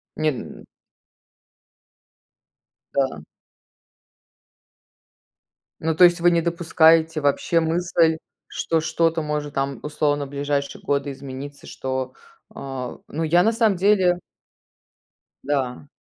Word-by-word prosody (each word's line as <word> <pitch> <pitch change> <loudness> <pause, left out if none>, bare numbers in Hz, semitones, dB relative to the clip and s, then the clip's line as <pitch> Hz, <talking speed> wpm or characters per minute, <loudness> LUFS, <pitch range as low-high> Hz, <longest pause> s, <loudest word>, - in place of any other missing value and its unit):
Нет, 155 -3 0
м - - -9 2.3
Да. 130 - 0 2.6
Ну, 160 0 +1
то 180 - +5
есть 175 -1 +6
вы 175 - +6
не 170 -1 +2
допускаете 165 -2 +3
вообще 145 +4 +2
мысль, 165 0 +2 0.3
что 165 -1 -1
что-то 160 0 0
может 150 -1 -3
там, 135 0 -2
условно, 145 -1 -1
в - - -15
ближайшие 140 0 -2
годы 140 0 -1
измениться, 140 +1 -9
что 130 -1 -4 0.4
а 130 -2 -6
Ну, 160 +3 -3
я 170 +3 +4
на 225 - +3
самом 225 -4 +2
деле 185 -2 +3 1.2
Да. 135 -1 -2
155 Hz, 105 wpm, -23 LUFS, 140-170 Hz, 2.6 s, есть